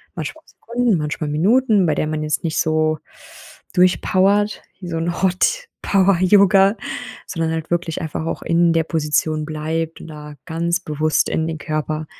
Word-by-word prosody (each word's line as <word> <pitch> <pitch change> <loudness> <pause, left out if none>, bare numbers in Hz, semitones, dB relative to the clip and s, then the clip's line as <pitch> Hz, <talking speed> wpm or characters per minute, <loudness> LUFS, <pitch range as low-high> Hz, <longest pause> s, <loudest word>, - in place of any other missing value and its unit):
Manchmal 315 - -6
Sekunden, 235 -4 -1
manchmal 150 0 -3
Minuten, 205 - +3
bei 155 - +1
der 155 - 0
man 155 0 -2
jetzt 150 -1 -1
nicht 160 -2 -1
so 155 -1 +1 0.7
durchpowert, 190 +3 +2 0.2
wie 180 - -8
so 165 -1 -3
'n 170 +1 -2
Hot-Power-Yoga, 195 - +3 0.5
sondern 165 -2 -2
halt 160 0 -5
wirklich 170 -1 -1
einfach 160 -1 -4
auch 165 - -3
in 170 0 +3
der 165 - +2
Position 155 -1 0
bleibt 160 +1 -3
und - - -10
da 150 -1 -10
ganz 170 +1 -1
bewusst 155 -2 0
in 160 0 -1
den 160 - -3
Körper 155 0 -3
165 Hz, 155 wpm, -20 LUFS, 155-185 Hz, 0.7 s, Minuten